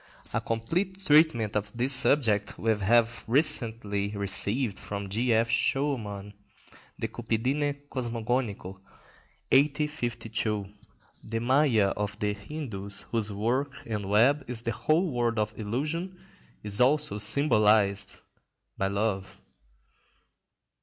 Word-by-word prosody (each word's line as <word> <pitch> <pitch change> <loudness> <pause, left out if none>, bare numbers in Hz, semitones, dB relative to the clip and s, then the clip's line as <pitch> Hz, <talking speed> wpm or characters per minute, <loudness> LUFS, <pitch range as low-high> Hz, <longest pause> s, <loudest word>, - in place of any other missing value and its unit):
A - - 0
complete 175 - -2
treatment 145 - +4
of 105 -1 -1
this 130 +3 +2
subject 115 -6 +3
we 115 - +1
have 115 +3 +2
recently 110 -6 0
received 100 +3 +2
from 100 -1 -6
G. 115 +5 0
F. 115 +1 +3
Schœmann, 115 -5 -1 0.7
"De - - -1
Cupidine 140 +6 -1
Cosmogonico," 115 -6 -2 0.7
1852. 120 -7 0 0.6
The 115 +1 -4
Mâya 120 -4 +3
of 105 -1 -3
the 105 -1 -1
Hindus, 100 -4 -6
whose 110 -3 0
work 125 +8 -1
and 105 -3 -4
web 130 +8 +4
is 120 -2 -4
the 115 - -1
whole 155 - +1
world 120 -2 0
of 105 -1 -1
illusion, 155 - -3 0.5
is 105 +1 -2
also 140 -4 +2
symbolised 105 -4 +2 0.6
by 95 - +1
love. 100 -1 -2
115 Hz, 110 wpm, -28 LUFS, 105-135 Hz, 0.7 s, treatment